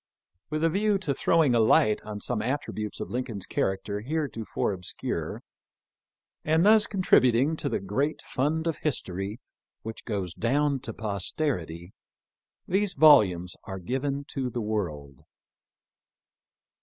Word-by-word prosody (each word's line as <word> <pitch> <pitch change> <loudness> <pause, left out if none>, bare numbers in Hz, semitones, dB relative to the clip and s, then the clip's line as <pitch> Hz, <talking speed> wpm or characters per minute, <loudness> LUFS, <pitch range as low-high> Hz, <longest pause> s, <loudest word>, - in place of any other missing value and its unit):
With 155 +1 -2
a 165 - +4
view 205 +2 +2
to 175 -8 -1
throwing 155 -1 +3
a 120 - +4
light 110 -1 +4
on 105 -1 -7
some 120 -4 -1
attributes 110 -4 -3
of - - -5
Lincoln's 120 -5 -3
character 100 +2 -2
heretofore 130 -4 -2
obscure, 90 -2 -4 1.0
and 160 +3 +3
thus 215 0 +6
contributing 140 - +3
to 140 - -2
the - - -1
great 135 +11 -1
fund 155 +5 -1
of 165 -2 -1
history 100 - -3 0.4
which 110 0 -7
goes 95 -6 -3
down 140 +6 +1
to 120 -3 -7
posterity, 100 - -3 0.7
these 195 +1 0
volumes 100 - +5
are 95 -1 -5
given 135 +9 -2
to 130 -2 -2
the 120 - -4
world. 85 - -3
125 Hz, 130 wpm, -27 LUFS, 100-150 Hz, 1.0 s, thus